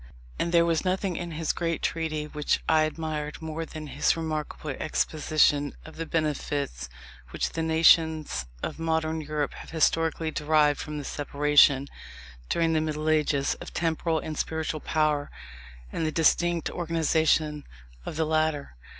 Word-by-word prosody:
And 170 - 0
there 170 -1 +5
was 165 -1 +1
nothing 185 0 0
in 175 +1 -4
his 160 0 -1
great 165 -2 -2
Treatise 155 -2 -2
which 150 -1 0
I 160 -1 +4
admired 155 -1 -4
more 160 0 -5
than 155 0 -7
his 145 +3 +1
remarkable 155 -2 -4
exposition 150 0 +1
of 160 - -11
the 165 0 -4
benefits 145 - -2 0.4
which - - -2
the 165 - -3
nations 160 - +3 0.2
of - - -4
modern 160 0 0
Europe 150 -1 -2
have - - -10
historically 160 0 +1
derived 150 -1 +2
from 150 -1 -5
the 145 - -4
separation, 145 -1 +3 0.6
during 165 -1 +2
the 155 - +2
Middle 155 0 -2
Ages, 150 -2 +2
of - - -9
temporal 165 0 0
and 155 0 -4
spiritual 160 -1 -2
power, 150 -2 0 0.6
and - - -2
the 155 - 0
distinct 170 +1 +2
organization 160 -3 +1 0.4
of - - -6
the 160 +1 +1
latter. 155 - 0
155 Hz, 150 wpm, -27 LUFS, 150-160 Hz, 0.6 s, there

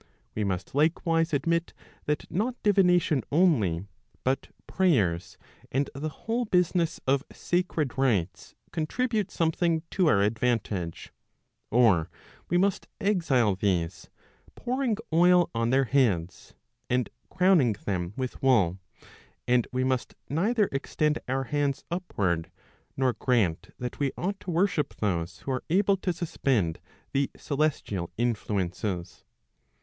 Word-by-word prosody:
We 105 - -1
must 95 -2 -3
likewise 165 +2 +2
admit 170 +3 0 0.3
that 150 0 -1
not 225 +8 0
divination 180 -8 +4
only, 115 - +3 0.4
but 130 +1 0 0.2
prayers, 105 - +1 0.3
and 135 +2 0
the 145 +3 -3
whole 230 +10 -2
business 180 -3 +1
of 135 +1 +2
sacred 175 -6 -1
rites 105 -10 0 0.2
contribute 215 +6 -1
something 165 0 +1
to 185 -3 +2
our 100 -9 +4
advantage, 105 -6 -1 0.6
or 105 -9 +4 0.4
we 175 - +3
must 195 +1 +1
exile 140 - +2
these, 90 -4 -1 0.5
pouring 250 -3 -1 0.2
oil 175 +1 +5
on 115 0 0
their 135 +2 +4
heads, 105 -10 0 0.3
and 125 0 0 0.2
crowning 180 - +4
them 90 -1 -2
with 130 -2 -4
wool, 100 -9 +3 0.7
and 125 -1 +3
we 130 0 0
must 130 -1 -1
neither 205 - +1
extend 150 +2 0
our 135 +1 0
hands 145 0 -1
upward, 95 - -1 0.5
nor 130 -2 +2
grant 110 -12 0
that 125 -1 -5
we 140 -2 +1
ought 195 +3 -2
to - - -9
worship 175 -2 +1
those 85 -4 -2
who 135 - -4
are 130 - -2
able 195 +3 +3
to 185 -1 -1
suspend 130 - -1 0.3
the 140 0 +1
celestial 135 - -1
influences. 100 -5 -2
135 Hz, 125 wpm, -27 LUFS, 105-175 Hz, 0.7 s, oil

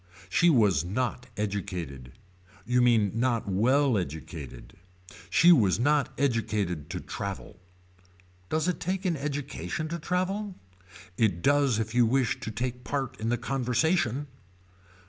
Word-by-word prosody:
She 170 - +4
was 105 - +4
not 125 +6 -2
educated. 90 -11 -4 0.5
You 125 0 +2
mean 115 -5 +4
not 115 -1 0
well 125 +5 +3
educated. 75 -6 -7 0.5
She 170 - +6
was 105 - +4
not 145 +3 +2
educated 105 - -1
to - - -4
travel. 100 -2 -6 0.9
Does 155 +2 0
it 180 - -1
take 185 +2 -2
an 175 -3 +1
education 145 +2 -4
to 170 +1 -4
travel. 185 +4 -2 0.6
It 95 -7 +1
does 140 -5 +3
if 110 0 -3
you 120 -1 +4
wish 130 0 +1
to - - -5
take 125 +3 -4
part 135 -1 -3
in 110 +1 -2
the 120 - +1
conversation. 130 +3 0
125 Hz, 130 wpm, -28 LUFS, 105-145 Hz, 0.9 s, She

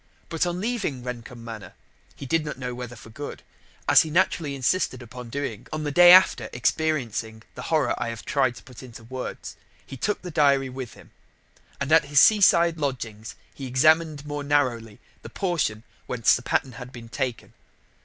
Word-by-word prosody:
But, 165 +1 0
on 175 0 -3
leaving 200 - -2
Rendcomb 120 -1 -8
Manor 110 -6 -8 0.4
(he - - -9
did 165 +4 +1
not 150 - -6
know 125 -1 -5
whether 120 -1 -7
for 110 0 -14
good), 145 +6 -8 0.4
as - - +7
he 160 - -3
naturally 160 -3 +1
insisted 130 -1 0
upon 120 +1 -10
doing 125 -4 -5
on 155 -1 -3
the 145 - -2
day 175 +3 +8
after 180 -11 +6
experiencing 120 -5 -1
the - - -8
horror - - +2
I - - -1
have 115 -1 -7
tried 130 -4 +1
to - - -13
put 125 -2 -13
into 120 -3 -12
words, 130 +2 -7 0.3
he - - -9
took 210 - -2
the 180 - -6
diary 140 -4 +3
with 130 -2 -7
him. - - -17 0.7
And 140 +2 -3
at 160 -2 +6
his 145 0 +3
seaside 170 -5 +5
lodgings 115 -6 -4 0.2
he 135 - -7
examined 155 +3 +2
more 145 -1 -4
narrowly 125 -7 0 0.2
the - - -10
portion 150 - -2 0.2
whence 115 -2 +3
the - - -4
pattern 130 +1 -1
had 125 0 -10
been 120 -2 -10
taken. 125 0 -4
135 Hz, 185 wpm, -25 LUFS, 120-155 Hz, 0.7 s, day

